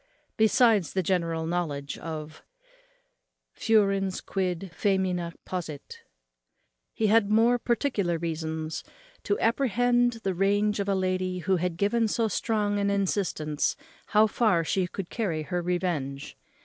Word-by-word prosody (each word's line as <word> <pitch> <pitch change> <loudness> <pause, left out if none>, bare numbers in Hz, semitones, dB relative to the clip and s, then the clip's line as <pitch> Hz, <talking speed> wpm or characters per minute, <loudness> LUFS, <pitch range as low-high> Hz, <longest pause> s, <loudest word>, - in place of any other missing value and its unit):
Besides 220 - +3
the 190 - 0
general 165 -3 0
knowledge 155 -5 -2
of 155 -1 -7 1.2
_ - - -21
Furens 195 -4 +2
quid 185 -1 -3
faemina 185 -4 0
possit,_ 165 -6 -6 0.9
he 220 - -1
had 215 -1 +4
more 230 +3 +4
particular 225 - 0
reasons 160 -1 -4 0.4
to 410 - -1
apprehend 245 0 +2
the 195 - 0
rage 205 +3 +1
of 200 0 -1
a 195 - +2
lady 185 -1 -1
who 190 -1 +3
had 175 -1 -2
given 220 +4 +2
so 225 +1 +1
strong 210 -1 0
an 200 0 +1
instance 185 -6 0 0.3
how 215 +1 +5
far 210 -5 +2
she 180 +2 0
could 185 0 -7
carry 175 -10 -2
her 175 +3 -2
revenge. 170 - -2
190 Hz, 130 wpm, -27 LUFS, 170-215 Hz, 1.2 s, how